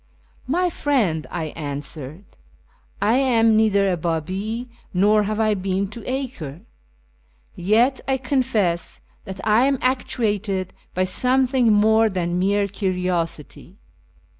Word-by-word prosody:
" - - -32
My 360 -1 +1
friend," 215 - 0
I 160 -3 -4
answered, 145 +2 -6 0.5
" 485 +2 -33
I - - +4
am 230 -4 +3
neither 205 -2 +3
a 185 - +1
Babi, 185 +9 -3 0.3
nor 210 +3 +4
have 210 +1 -2
I 215 -1 +3
been 190 0 -1
to 220 +2 -9
Acre; 245 - -5 0.9
yet 225 +9 +2
I 265 -1 +1
confess 245 -10 0 0.3
that 190 0 -7
I 220 +4 +4
am 275 -1 +1
actuated 220 -7 -1 0.2
by 185 - +2
some 255 +7 +2
thing 250 -3 +2
more 220 +2 +4
than 175 -2 -1
mere 200 +2 +2
curiosity. 180 -3 -3
205 Hz, 130 wpm, -22 LUFS, 180-245 Hz, 0.9 s, I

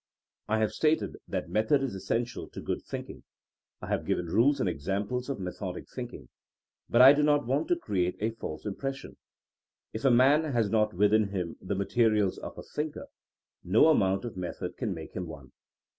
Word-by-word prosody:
I 110 - +1
have 110 -1 +1
stated 155 0 +1
that - - -3
method 110 +6 +2
is 135 - -2
essential 115 +5 -3
to - - -8
good - - -3
thinking. - - -7 0.6
I - - -5
have - - 0
given 90 - 0
rules 115 - +3
and - - +1
examples 100 - -2
of 135 - -3
methodic 90 0 -5
thinMng. - - -7 0.6
But 120 +2 +6
I 135 +2 +10
do 145 - +1
not 145 -2 +3
want 135 +6 0
to 175 - +3
create 95 - -1
a 110 +2 0
false 110 -8 -7
impression. 135 +7 -5 0.8
If 110 - -5
a 135 - +5
man 140 +5 +4
has 115 -4 +1
not 105 -3 +2
within 105 +2 +4
him 95 -4 -4
the 100 +2 -3
materials 105 0 +2
of - - -8
a - - -7
thinker, 150 0 -5 0.5
no 110 - +5
amount 95 -8 +2
of 120 - -6
method 90 -1 -5
can - - -3
make - - -9
him 90 -1 -4
one. 70 -5 -10
110 Hz, 185 wpm, -29 LUFS, 95-135 Hz, 0.8 s, I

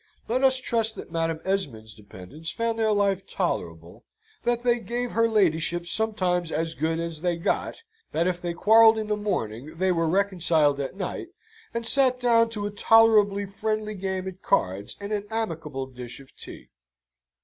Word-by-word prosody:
Let 255 +4 0
us 260 -1 +5
trust 225 -3 -1
that - - -9
Madam 165 -1 -1
Esmond's 130 - -2
dependants 105 - -9
found 230 +4 -2
their 220 -1 +2
life 200 -2 +1
tolerable, 85 - -4 0.4
that 240 0 +1
they 240 -1 +2
gave 240 +1 -3
her 230 0 +3
ladyship 175 -5 +1
sometimes 180 -5 -1
as 165 +1 -1
good 160 +2 -1
as 165 -2 -4
they 175 -1 0
got, 170 - -1 0.4
that 165 - +1
if 180 -1 -1
they 175 -1 -3
quarrelled 220 +4 +6
in 220 - -2
the 210 - +2
morning 155 - -3
they 185 +1 +2
were 165 -2 +1
reconciled 165 -6 +2
at 140 +5 -4
night, 195 - -4 0.4
and 235 0 -4
sate 255 0 +3
down 230 -2 +4
to 210 -3 -4
a 205 - -3
tolerably 205 -1 +4
friendly 215 +2 -3
game 190 -1 -3
at 190 0 -8
cards 100 - 0
and 200 +1 -5
an 205 0 -3
amicable 165 -11 -3
dish 125 -2 -9
of 135 - -17
tea. - - -11
190 Hz, 170 wpm, -25 LUFS, 160-220 Hz, 0.4 s, quarrelled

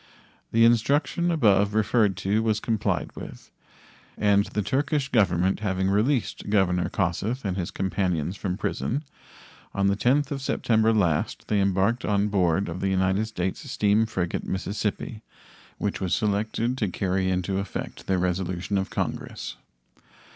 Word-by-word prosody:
The 115 0 +5
instruction 140 +9 +2
above 105 - +3
referred 105 -2 +2
to 105 +3 +2
was 110 -1 +1
complied 105 -6 -1
with, - - -10 0.7
and 100 -1 +3
the 105 - -2
Turkish 140 +3 0
Government 95 -5 +2
having 95 -2 0
released 110 +2 0
Governor 90 -4 +2
Kossuth 100 +7 -1
and 95 -2 -1
his 90 -3 -3
companions 90 -3 -1
from 95 -1 -3
prison, 135 +6 -2 0.7
on 100 - +1
the 100 0 +3
10th 135 +7 +2
of 140 -1 -3
September 110 -4 +2
last 90 -9 0
they 105 -2 +2
embarked 100 +5 +1
on 105 0 +1
board 95 -1 +2
of 85 +2 -5
the 95 - +1
United 95 +3 +1
States 100 - -4
steam 105 -1 +2
frigate 90 -5 -2
Mississippi, 105 +3 -3 0.6
which 100 -1 -2
was 95 -2 +1
selected 110 +4 -1
to 105 - +1
carry 95 0 -1
into 95 +1 -1
effect 100 -1 -6
the 95 - +2
resolution 90 +2 -1
of 95 - -3
Congress. - - -4
100 Hz, 145 wpm, -25 LUFS, 95-110 Hz, 0.7 s, The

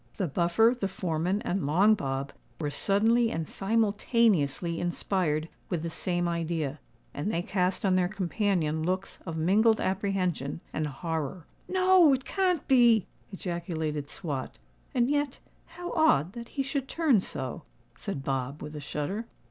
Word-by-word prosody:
The 195 - 0
Buffer, 175 - +3
the 195 - +1
foreman, 180 +1 -1
and 180 -5 -1
Long 190 +9 +5
Bob 135 -6 -2 0.3
were 150 -3 -2
suddenly 225 +7 +2
and 165 -6 -3
simultaneously 200 - +1
inspired 175 -3 0 0.2
with 170 -3 -2
the 165 - -3
same 175 +1 -1
idea; 165 -4 -2 0.3
and 180 +9 -2
they 170 -2 -1
cast 185 +1 0
on 190 - +3
their 185 -1 +3
companion 185 -5 0
looks 185 +4 -2
of 165 -1 -3
mingled 210 +7 +4
apprehension 185 -7 -1
and 155 -1 -1
horror. 160 +2 -4 0.2
"No—it 365 -8 +5
can't 365 -5 0
be!" 240 -5 +5 0.3
ejaculated 165 -6 -3
Swot. 145 -7 -5 0.4
"And 240 -1 +3
yet—how 295 +4 -4
odd 180 - +3
that 235 -1 -8
he 275 - +2
should 275 -1 -2
turn 295 -7 +3
so," 130 -8 -4 0.3
said 135 - -5
Bob, 135 +1 -2
with 150 +1 -7
a - - -4
shudder. 150 +10 -3
185 Hz, 140 wpm, -28 LUFS, 155-225 Hz, 0.4 s, Long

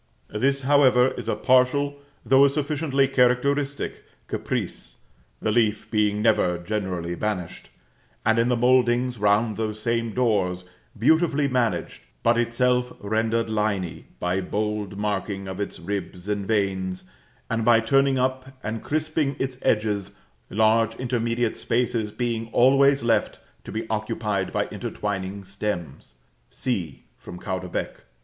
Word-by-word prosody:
This, 135 +5 +1
however, 130 -2 +5
is - - -6
a - - +1
partial, 140 +3 +2 0.3
though 135 +1 +6
a 140 - +6
sufficiently 140 -1 0
characteristic, 135 +2 +1 0.2
caprice, - - -4 0.4
the 110 - 0
leaf 110 -2 +1
being 105 -1 +1
never 90 -6 +3
generally 90 -2 -3
banished, 90 -2 -4 0.6
and 110 +1 +3
in 115 +1 +2
the 125 - +2
mouldings 125 0 +3
round 105 +1 +2
those 110 -1 -3
same 115 0 -1
doors, 95 -7 +1 0.3
beautifully 150 +4 +3
managed, 120 -10 -1 0.2
but 115 +1 +4
itself 125 +1 +1
rendered 110 +2 0
liny 105 -5 -2
by 90 +2 0
bold 105 0 -3
marking 100 -1 -2
of 95 0 -6
its 100 - -4
ribs 95 0 -5
and 100 -2 -2
veins, 95 -3 -1 0.4
and 115 -1 -1
by 115 0 +6
turning 135 +4 +3
up, 130 +1 -2
and 110 +1 -3
crisping 155 -2 -1
its 130 -1 -3
edges, 105 -2 0 0.3
large 110 +2 +3
intermediate 120 -2 -1
spaces 115 -2 0
being 115 0 -2
always 135 +2 +5
left 115 -3 +1 0.2
to - - -8
be 110 +1 -4
occupied 105 -2 -2
by - - 0
intertwining 100 -1 -4
stems 85 -10 -5 0.3
(c, 105 -10 -3 0.2
from 90 - -9
Caudebec). 95 -1 -4
110 Hz, 130 wpm, -24 LUFS, 100-125 Hz, 0.6 s, though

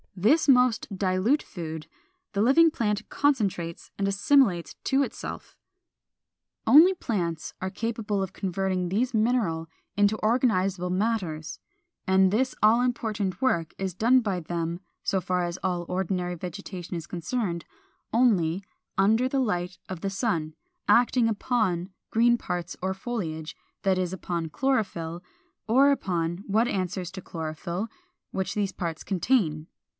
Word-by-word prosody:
This 230 - +3
most 250 -3 +4
dilute 190 +9 +2
food 160 -3 -7 0.5
the 200 - +1
living 275 +9 +6
plant 210 -5 -1
concentrates 200 -12 0
and 200 - +1
assimilates 195 -2 +3
to 270 +1 +3
itself. - - -7 1.1
Only 330 +7 +8
plants 175 - -3
are 185 - -1
capable 215 0 -2
of 190 0 -3
converting 185 -1 -1
these 240 +7 0
mineral 215 -8 +1 0.3
into 205 +1 +3
organizable 195 -6 +1
matters; 185 -6 -1 0.5
and 190 -1 +4
this 255 +5 +1
all 225 +3 +6
important 215 -6 -1
work 170 -11 +1
is 190 -2 -3
done 240 +7 +4
by 200 -5 -1
them 170 +1 -3 0.2
(so 190 -2 +1
far 180 0 0
as 175 +1 -3
all 175 -2 -1
ordinary 180 -1 -1
vegetation 180 0 -6
is 165 -1 -5
concerned) 175 -1 -3 0.5
only 200 -7 +2 0.3
451. 195 - +4
Under 240 +4 +3
the 275 - 0
light 180 -7 -1
of 185 -3 -6
the 195 - -1
sun, 170 -8 -1 0.3
acting 245 -1 +4
upon 205 -5 0 0.2
green 240 +1 +4
parts 175 -5 -4
or 190 +1 0
foliage, 170 -8 -4 0.3
that 190 -1 +3
is, 185 -1 -1
upon 175 -2 -3
the 160 - -5
chlorophyll, 180 - -1 0.4
or 265 +5 +5
upon 175 -9 -1
what 220 +4 +2
answers 185 -3 -2
to 190 0 -7
chlorophyll, 170 +5 -4 0.4
which 190 0 -2
these 205 -2 0
parts 165 -3 -4
contain. 170 -6 +1
190 Hz, 140 wpm, -27 LUFS, 175-230 Hz, 1.1 s, Only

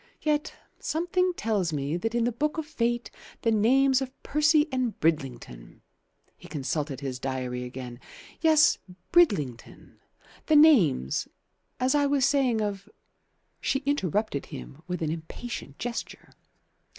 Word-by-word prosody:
Yet 300 -1 0 0.2
something 360 +3 0
tells 205 - 0
me 145 +1 -2
that 225 +6 -2
in 240 - +2
the 240 - +1
Book 300 +7 -1
of 320 - -2
Fate 240 -5 -1 0.3
the 230 - +3
names 260 +5 +4
of 265 - -3
Percy 300 +1 +3
and 255 -4 -1
Bridlington" 125 - -2 0.5
he - - -14
consulted 140 0 -3
his 130 -2 -4
diary 130 -2 -3
again 125 -1 -8 0.4
"yes, 315 -2 +5 0.3
Bridlington; 185 - +1 0.5
the 315 - +4
names, 205 - +5 0.5
as 255 +1 +2
I 290 -1 +3
was 280 -2 +2
saying, 265 -5 +2
of 205 -1 -3 0.4
" - - -46
She 270 +1 0
interrupted 210 - -1
him 140 - -9
with 180 -2 -3
an 155 - -1
impatient 160 - -7
gesture. 240 -1 -6
225 Hz, 135 wpm, -27 LUFS, -, 0.5 s, yes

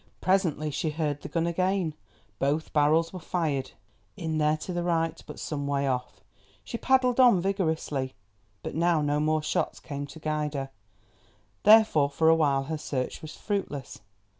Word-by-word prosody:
Presently 170 -6 +1
she 155 +3 -1
heard 150 -2 -2
the - - -7
gun 165 -1 0
again; 185 -1 0 0.5
both 145 +3 -1
barrels 155 +3 +3
were 185 - -6
fired, 160 -6 -2 0.4
in 160 -4 -2
there 150 0 +2
to 180 - -6
the 175 - -1
right, 165 -2 0
but - - -9
some 145 -2 -3
way 140 -1 0
off. 125 -1 -3 0.4
She - - -7
paddled 260 -1 +3
on 245 -7 +7
vigorously, 160 - -1 0.5
but - - -5
now 165 -1 +2
no 145 0 +1
more 155 0 +1
shots - - -1
came 145 -2 -6
to 145 - -11
guide 150 -1 -2
her, 135 -1 -4 0.9
therefore 210 -10 +6
for 160 +3 +2
a 165 - +7
while 140 -4 +2
her 155 +2 -4
search 130 -4 -3
was 155 -1 -8
fruitless. 195 - -4
155 Hz, 165 wpm, -27 LUFS, 145-175 Hz, 0.9 s, on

